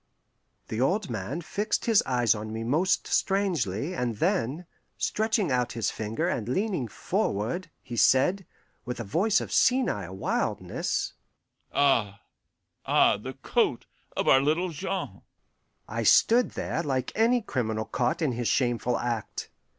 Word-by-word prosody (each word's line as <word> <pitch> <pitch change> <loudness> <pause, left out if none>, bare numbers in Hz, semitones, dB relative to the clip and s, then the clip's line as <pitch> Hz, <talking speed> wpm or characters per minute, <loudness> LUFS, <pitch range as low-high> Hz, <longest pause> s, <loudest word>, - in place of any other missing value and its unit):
The 110 +2 -2
old 185 - +1
man 115 - -4
fixed 210 +6 -2
his 225 -3 +5
eyes 120 -2 +3
on 110 0 -6
me 110 +1 -4
most 155 +11 +1
strangely, 175 - 0
and 125 -8 -2
then, 130 +10 0 0.3
stretching 215 -6 0
out 125 -1 0
his 115 -3 -1
finger 110 +10 -2
and 120 - -2
leaning 185 - -1
forward, 140 - -2
he 120 - -7
said, 175 - +3 0.4
with 125 -1 -5
a - - -2
voice 195 - +2
of - - -6
senile 105 - +2
wildness, - - -2 0.6
"Ah, 115 -8 +2 0.6
ah, - - +4
the - - -7
coat - - +1 0.3
of - - 0
our 135 - +6
little 160 +6 +1
Jean!" 185 +4 -4 0.7
I - - -3
stood 240 +2 +4
there 165 - -1
like 130 -5 -2
any 235 +3 +3
criminal 110 - -2
caught 125 +6 -1
in 145 - +2
his 120 -1 -2
shameful 120 -1 +1
act. 120 -3 -4
130 Hz, 140 wpm, -27 LUFS, 115-185 Hz, 0.7 s, our